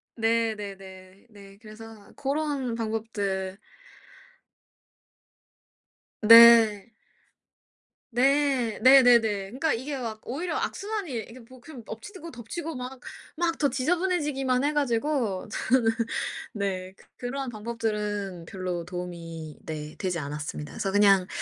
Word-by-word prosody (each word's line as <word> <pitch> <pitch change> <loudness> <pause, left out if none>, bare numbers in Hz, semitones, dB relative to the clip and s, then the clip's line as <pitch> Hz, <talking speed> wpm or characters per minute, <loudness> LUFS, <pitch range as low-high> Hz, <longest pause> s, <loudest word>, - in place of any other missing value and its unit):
네. 225 -1 +1
네네. 195 0 -11
네. 200 -2 -15
그래서 215 -1 -12
고런 280 -4 -2
방법들 205 -4 -3 2.6
네. 230 -1 +8 1.2
네. 265 -2 +2
네네네. 255 -2 +8
그러니까 220 +8 -2
이게 275 +5 -4
막 225 -4 -5
오히려 330 +8 -3
악순환이 405 -6 -3 0.2
이게 250 +3 -12
뭐 255 +2 -16
그 260 -6 -11
엎치고 335 - -9
덮치고 305 +7 -6
막 250 +1 -7 0.4
막 335 0 0
더 285 -3 +3
지저분해지기만 285 -3 0
해 295 +1 +1
가지고 245 -6 0
저는 230 -2 +2 0.6
네 190 -3 -3
그 - - -20 0.2
그러한 270 0 -4
방법들은 210 -5 -3
별로 180 -2 -4
도움이 170 -3 -7
네 150 -1 -6
되지 185 -3 -2
않았습니다. 150 0 -5
그래서 195 - -2
그냥 195 -2 +5
225 Hz, 235 characters per minute, -26 LUFS, 195-265 Hz, 2.6 s, 네